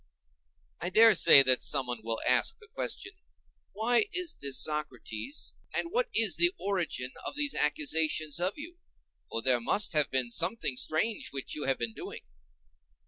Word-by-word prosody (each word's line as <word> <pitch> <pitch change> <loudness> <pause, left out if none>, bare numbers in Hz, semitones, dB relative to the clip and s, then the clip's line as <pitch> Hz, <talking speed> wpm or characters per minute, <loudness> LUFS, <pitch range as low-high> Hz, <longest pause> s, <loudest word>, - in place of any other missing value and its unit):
I 175 - -3
dare 220 +3 +6
say 140 -6 +7
that 130 -1 +3
someone 125 -4 -1
will 115 0 -4
ask - - +2
the 435 - -19
question, 390 -2 -6 0.6
"Why 235 - +2
is 360 -4 -2
this, 140 -2 +1
Socrates, 150 - -4 0.2
and 335 - -2
what 485 +4 -1
is 220 -4 +3
the 345 0 +6
origin 175 -10 -2
of - - -4
these 290 -1 0
accusations 155 0 0
of 180 +3 -1
you: 340 +4 -10 0.5
for 115 - -4
there 125 -1 +2
must 195 - +1
have 150 -2 +4
been 130 -2 -2
something 180 - +1
strange 155 - -2
which 135 -1 -5
you 150 - -5
have 135 -1 0
been 115 -2 -4
doing? - - -9
155 Hz, 160 wpm, -29 LUFS, -, 0.6 s, say